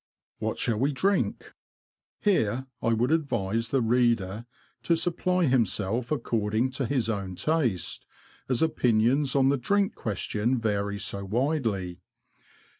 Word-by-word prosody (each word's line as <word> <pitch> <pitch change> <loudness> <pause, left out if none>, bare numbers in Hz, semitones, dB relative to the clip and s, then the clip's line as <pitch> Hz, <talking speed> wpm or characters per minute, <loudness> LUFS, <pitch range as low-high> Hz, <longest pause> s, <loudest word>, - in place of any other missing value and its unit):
What - - -2
shall 115 -3 0
we 140 +4 +1
drink? 195 +8 0 0.7
Here 130 - +1 0.2
I - - -1
would 120 +4 +1
advise 115 -8 0
the 135 -2 +1
reader 115 -3 +1 0.3
to 170 - +2
supply 180 +1 +1
himself 115 - 0
according 115 -3 0
to 130 -1 -2
his 125 -4 0
own 100 -4 -3
taste, 130 - -1 0.4
as 130 +3 +2
opinions 125 -1 +2
on 135 -1 +4
the 140 - +2
drink 200 +10 +1
question 110 +3 -1
vary 100 -3 -1
so 100 0 -3
widely. 110 - -1
120 Hz, 125 wpm, -27 LUFS, 105-140 Hz, 0.7 s, on